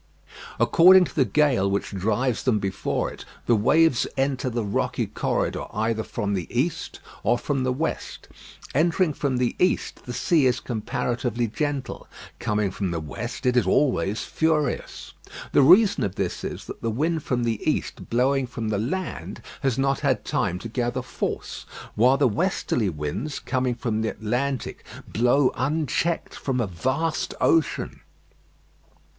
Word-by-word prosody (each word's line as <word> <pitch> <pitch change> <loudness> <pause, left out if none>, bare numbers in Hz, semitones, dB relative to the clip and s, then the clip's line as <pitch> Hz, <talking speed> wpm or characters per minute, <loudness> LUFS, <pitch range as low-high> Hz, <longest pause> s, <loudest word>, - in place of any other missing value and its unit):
According 185 +1 +7
to 135 - -10
the 135 - +4
gale 125 -5 +2
which 100 +1 -1
drives 110 +5 0
them 125 -5 +2
before 100 -1 -2
it, - - -11 0.2
the 120 - +4
waves 145 +6 +3
enter 135 -1 0
the 120 -1 -2
rocky 100 - -1
corridor - - -1
either 110 +1 0
from 105 -2 -3
the 90 -4 -2
east 135 +8 -2 0.2
or 120 +4 +2
from 135 +1 -1
the 130 - +1
west. 155 +6 -3 0.5
Entering 165 +2 +2
from 140 -3 -1
the 125 -1 0
east, 180 0 0
the 125 - -5
sea 140 +3 +3
is 125 - +1
comparatively 120 +1 -2
gentle; 145 +4 -3 0.3
coming 105 -2 0
from 95 0 -2
the 85 -1 -2
west, 75 - -6
it 125 0 +3
is 125 - +3
always 120 -7 +2
furious. 155 -4 -1 0.4
The - - +5
reason 190 +9 +6
of 100 -1 -2
this 95 -3 -3
is, - - -5
that - - -9
the 115 - -1
wind 155 +8 0
from 125 -3 -1
the 115 -2 -1
east - - -3
blowing 130 +2 +2
from 115 -3 -4
the 105 -2 0
land 180 - -4 0.2
has 135 -5 +1
not 135 0 +1
had - - 0
time 90 - 0
to - - -1
gather 120 +2 -2
force; - - -4 0.3
while 125 +5 +4
the 140 -2 +4
westerly 120 - 0
winds, 80 - -4
coming 130 -2 -1
from 115 -2 -2
the 110 - 0
Atlantic, 125 +4 -2 0.2
blow 125 +4 +3
unchecked 155 +4 -1
from 130 -2 -2
a 120 - +1
vast 130 - -1
ocean. 165 -2 +1
125 Hz, 155 wpm, -24 LUFS, 110-145 Hz, 0.5 s, According